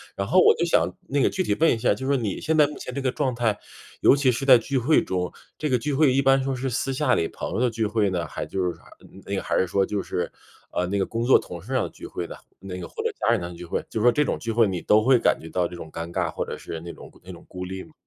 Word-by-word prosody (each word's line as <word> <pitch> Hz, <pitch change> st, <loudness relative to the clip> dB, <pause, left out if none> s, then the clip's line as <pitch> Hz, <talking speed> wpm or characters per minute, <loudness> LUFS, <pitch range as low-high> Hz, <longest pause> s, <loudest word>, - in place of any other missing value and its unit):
然 100 Hz, 0 st, -3 dB
后 185 Hz, -, +4 dB
我 -, -, +7 dB
就 170 Hz, -, -1 dB
想 170 Hz, -, +3 dB, 0.2 s
那 140 Hz, +1 st, 0 dB
个 -, -, +4 dB
具 190 Hz, -, -1 dB
体 105 Hz, -, 0 dB
问 160 Hz, -3 st, +4 dB
一 -, -, -2 dB
下， 105 Hz, -, +2 dB
就 130 Hz, -, -6 dB
是 140 Hz, -, +2 dB
说 130 Hz, -, +1 dB
你 105 Hz, -4 st, -2 dB
现 160 Hz, 0 st, 0 dB
在 150 Hz, -2 st, +5 dB
目 150 Hz, -, -8 dB
前 125 Hz, -, -7 dB
这 140 Hz, -, -3 dB
个 130 Hz, -1 st, 0 dB
状 135 Hz, -4 st, -1 dB
态， 115 Hz, -3 st, 0 dB, 0.4 s
尤 -, -, +6 dB
其 135 Hz, -2 st, +3 dB
是 130 Hz, +4 st, -3 dB
在 130 Hz, -3 st, +8 dB
聚 135 Hz, +4 st, -2 dB
会 140 Hz, +6 st, +3 dB
中， 90 Hz, -1 st, -2 dB, 0.2 s
这 155 Hz, -, -2 dB
个 125 Hz, -3 st, +2 dB
聚 140 Hz, +3 st, -2 dB
会 140 Hz, -3 st, +4 dB
一 135 Hz, -, +3 dB
般 135 Hz, 0 st, +4 dB
说 135 Hz, -1 st, -1 dB
是 130 Hz, +1 st, -2 dB
私 135 Hz, +3 st, -1 dB
下 130 Hz, -1 st, +2 dB
里 80 Hz, -, 0 dB
朋 -, -, -6 dB
友 -, -, -1 dB
的 125 Hz, -2 st, +2 dB
聚 110 Hz, -1 st, -1 dB
会 105 Hz, -2 st, +1 dB
呢， 85 Hz, -4 st, -2 dB
还 -, -, -5 dB
就 95 Hz, -1 st, -2 dB
是 90 Hz, -1 st, -2 dB
啥 -, -, -23 dB, 0.4 s
那 100 Hz, -, -3 dB
个 -, -, -1 dB
还 -, -, -1 dB
是 95 Hz, -, +3 dB
说 95 Hz, +2 st, +1 dB
就 100 Hz, 0 st, -2 dB
是， 90 Hz, -, -3 dB, 0.4 s
呃， 90 Hz, -, 0 dB
那 100 Hz, +2 st, -1 dB
个 95 Hz, -, 0 dB
工 115 Hz, +1 st, -2 dB
作 130 Hz, -, +6 dB
同 -, -, -8 dB
事 -, -, -7 dB
要 -, -, 0 dB
聚 -, -, -12 dB
会 -, -, -5 dB
的， -, -, -9 dB, 0.2 s
那 95 Hz, -2 st, -7 dB
个 85 Hz, -, -6 dB
或 -, -, -6 dB
者 -, -, 0 dB
家 -, -, +2 dB
人 115 Hz, -6 st, +2 dB
的 85 Hz, 0 st, -5 dB
聚 90 Hz, +1 st, -9 dB
会， -, -, -3 dB
就 110 Hz, -, -3 dB
说 120 Hz, +2 st, +5 dB
这 150 Hz, +4 st, +2 dB
种 -, -, -1 dB
聚 115 Hz, -, -4 dB
会 115 Hz, -1 st, +4 dB
你 90 Hz, -2 st, -2 dB
都 105 Hz, +1 st, +4 dB
会 130 Hz, +1 st, +5 dB
感 -, -, +2 dB
觉 80 Hz, -, -9 dB
到 90 Hz, +1 st, 0 dB
这 90 Hz, -, -10 dB
种 80 Hz, -2 st, -9 dB
尴 85 Hz, +1 st, -6 dB
尬 85 Hz, -3 st, 0 dB
或 -, -, -3 dB
者 -, -, -5 dB
是 80 Hz, -, -7 dB
那 85 Hz, 0 st, -8 dB
种 -, -, -13 dB
那 95 Hz, -, -10 dB
种 85 Hz, -, -12 dB
孤 90 Hz, 0 st, -6 dB
立 95 Hz, +1 st, -6 dB
吗？ 155 Hz, -, -18 dB
115 Hz, 350 characters per minute, -24 LUFS, 95-135 Hz, 0.4 s, 在